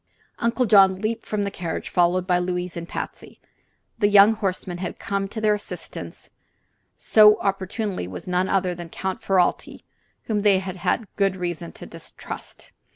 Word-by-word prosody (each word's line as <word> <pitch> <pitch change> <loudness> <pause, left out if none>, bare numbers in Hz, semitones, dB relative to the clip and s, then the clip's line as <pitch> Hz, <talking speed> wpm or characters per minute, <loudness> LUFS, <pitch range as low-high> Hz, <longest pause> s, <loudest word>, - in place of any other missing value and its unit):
Uncle 235 +2 +1
John 195 -3 +6
leaped 220 +3 -3
from 210 -1 -1
the 200 - -2
carriage, 170 -4 -4
followed 175 +1 +2
by 180 -1 +2
Louise 180 0 -3
and 170 0 -6
Patsy. - - -7 0.6
The 205 - +4
young 205 +1 +7
horseman 185 -4 -3
who - - -7
had - - -9
come 200 0 -2
to 220 +3 -6
their 215 -1 +3
assistance 210 - -7 0.7
so 210 -1 +6
opportunely 195 - -2
was 90 - -8
none 180 +1 0
other 185 -2 +1
than 175 -1 -8
Count 190 +2 -4
Ferralti, 185 -2 0 0.4
whom 210 -2 -1
they 200 -2 +4
had 185 -1 -5
such 205 +5 0
good 195 -2 +2
reason 175 - -4
to - - -10
distrust. - - -10
190 Hz, 165 wpm, -23 LUFS, 180-205 Hz, 0.7 s, young